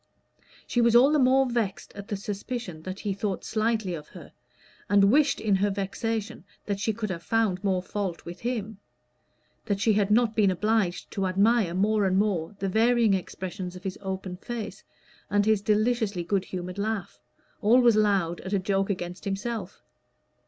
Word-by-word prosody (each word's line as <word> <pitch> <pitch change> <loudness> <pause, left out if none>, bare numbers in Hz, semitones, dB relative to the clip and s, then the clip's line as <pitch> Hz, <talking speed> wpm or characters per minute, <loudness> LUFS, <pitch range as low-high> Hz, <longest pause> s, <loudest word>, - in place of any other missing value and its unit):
She 240 - +1
was 235 0 +4
all 260 +4 +7
the 305 - +3
more 265 +1 +4
vexed 235 -5 -2
at 200 0 -9
the 205 - -3
suspicion 200 -3 -5
that 185 +3 -7
he 205 -2 -1
thought 200 -1 -3
slightly 220 -3 0
of 150 -2 -7
her; - - -13 0.6
and 200 0 +5
wished 295 +2 +3
in 205 -3 +2
her 205 +2 +1
vexation 215 +3 -3 0.2
that 200 -1 -2
she 215 +2 0
could 215 -2 -4
have 170 -2 -5
found 210 -2 0
more 190 -2 +1
fault 190 -3 -4
with 175 +1 -8
him 220 -4 -3 0.9
that 200 -3 -1
she 215 +1 +3
had 205 -1 +2
not 225 +1 +3
been 210 -3 +4
obliged 205 -1 0
to 195 -1 -1
admire 200 -1 +2
more 210 +2 +2
and 190 0 +2
more 200 -3 0
the 195 - -2
varying 225 +1 +3
expressions 185 0 -4
of 180 - -10
his 190 -1 -5
open 190 -1 -5
face 230 +2 -6 0.5
and 205 0 +2
his 215 -2 +3
deliciously 215 -2 +1
good 190 +2 0
humored 180 +1 -6
laugh, 205 - -3 0.4
always 235 +1 +5
loud 195 -6 +1
at 190 - -6
a - - +4
joke 195 +1 0
against 180 -2 -4
himself. 205 0 -4
205 Hz, 175 wpm, -27 LUFS, 190-225 Hz, 0.9 s, all